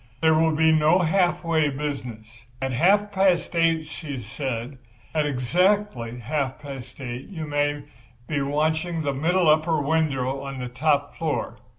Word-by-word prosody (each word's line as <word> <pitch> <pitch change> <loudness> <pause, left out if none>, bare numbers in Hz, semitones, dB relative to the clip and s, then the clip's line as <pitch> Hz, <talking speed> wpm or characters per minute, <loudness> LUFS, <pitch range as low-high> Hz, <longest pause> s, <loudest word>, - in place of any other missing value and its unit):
There 160 0 +4
will 160 0 +3
be 160 +1 +4
no 155 +2 +4
half 180 0 +2
way 160 -3 +2
business. 135 -6 -5 0.3
At 135 0 -2
half 200 +10 +3
past 190 -3 +2
eight,' 165 -1 +2
she 155 -2 -7
said, 125 +2 -5 0.3
'at 155 -2 +1
exactly 145 - +1
half 135 +2 -2
past 135 -4 -9
eight 125 -1 -6
you 165 -6 -6
may 145 0 -1 0.4
be 145 -2 -1
watching 155 +4 0
the 140 -1 0
middle 170 +5 +2
upper 155 +1 +3
window 140 -3 0
of 135 -1 -6
the 125 -1 -5
top 145 +3 0
floor. 160 -3 -2
150 Hz, 155 wpm, -24 LUFS, 135-165 Hz, 0.4 s, There